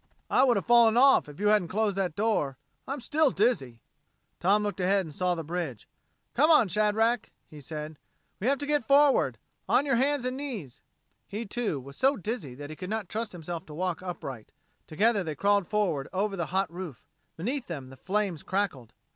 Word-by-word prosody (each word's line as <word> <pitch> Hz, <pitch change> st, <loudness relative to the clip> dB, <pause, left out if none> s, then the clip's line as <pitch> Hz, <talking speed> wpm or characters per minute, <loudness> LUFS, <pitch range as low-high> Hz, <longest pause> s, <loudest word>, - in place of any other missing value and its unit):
"I -, -, +5 dB
would 245 Hz, -4 st, +4 dB
have 195 Hz, -, -2 dB
fallen 235 Hz, -1 st, +5 dB
off, 265 Hz, -, +5 dB
if 145 Hz, -, -12 dB
you 205 Hz, 0 st, +2 dB
hadn't 210 Hz, -4 st, +3 dB
closed 210 Hz, +2 st, 0 dB
that 185 Hz, -5 st, -1 dB
door. 200 Hz, -11 st, 0 dB, 0.3 s
I'm 275 Hz, +2 st, -3 dB
still 305 Hz, +4 st, +2 dB
dizzy." 190 Hz, -, 0 dB, 0.6 s
Tom 200 Hz, +4 st, +3 dB
looked 205 Hz, -2 st, -3 dB
ahead 190 Hz, +1 st, +2 dB
and 155 Hz, -, -9 dB
saw 180 Hz, +2 st, 0 dB
the 165 Hz, -, -4 dB
bridge. 160 Hz, -8 st, -4 dB, 0.5 s
"Come 300 Hz, +6 st, +4 dB
on, 300 Hz, -, +6 dB
Shadrack," 215 Hz, +4 st, +1 dB, 0.2 s
he 150 Hz, -1 st, -13 dB
said. 150 Hz, +1 st, -7 dB, 0.4 s
"We 210 Hz, -, -1 dB
have 275 Hz, +1 st, +3 dB
to 285 Hz, -, -4 dB
get 290 Hz, -5 st, 0 dB
forward. 280 Hz, 0 st, +4 dB, 0.3 s
On 285 Hz, -, +4 dB
your 270 Hz, -4 st, +2 dB
hands 275 Hz, 0 st, +1 dB
and 255 Hz, 0 st, -1 dB
knees." 230 Hz, -, -6 dB, 0.5 s
He, 215 Hz, +3 st, -5 dB
too, 210 Hz, -, -2 dB
was 140 Hz, +2 st, -11 dB
so 270 Hz, +2 st, +3 dB
dizzy 205 Hz, -, -4 dB
that 145 Hz, +2 st, -8 dB
he -, -, -7 dB
could 185 Hz, +3 st, -7 dB
not 215 Hz, -3 st, -3 dB
trust 225 Hz, +1 st, -3 dB
himself 170 Hz, -1 st, -6 dB
to 150 Hz, -, -9 dB
walk 180 Hz, 0 st, -2 dB
upright. 140 Hz, -11 st, -7 dB, 0.4 s
Together 205 Hz, +5 st, +2 dB
they 155 Hz, -3 st, -4 dB
crawled 200 Hz, +2 st, +2 dB
forward 185 Hz, -10 st, 0 dB
over 200 Hz, +2 st, -1 dB
the 170 Hz, -3 st, -2 dB
hot 190 Hz, -1 st, -1 dB
roof. 175 Hz, -8 st, -8 dB, 0.3 s
Beneath 245 Hz, -, -3 dB
them 140 Hz, -6 st, -6 dB
the 135 Hz, -, -12 dB
flames 190 Hz, 0 st, -1 dB
crackled. 185 Hz, -, -2 dB
195 Hz, 195 wpm, -28 LUFS, 160-230 Hz, 0.6 s, on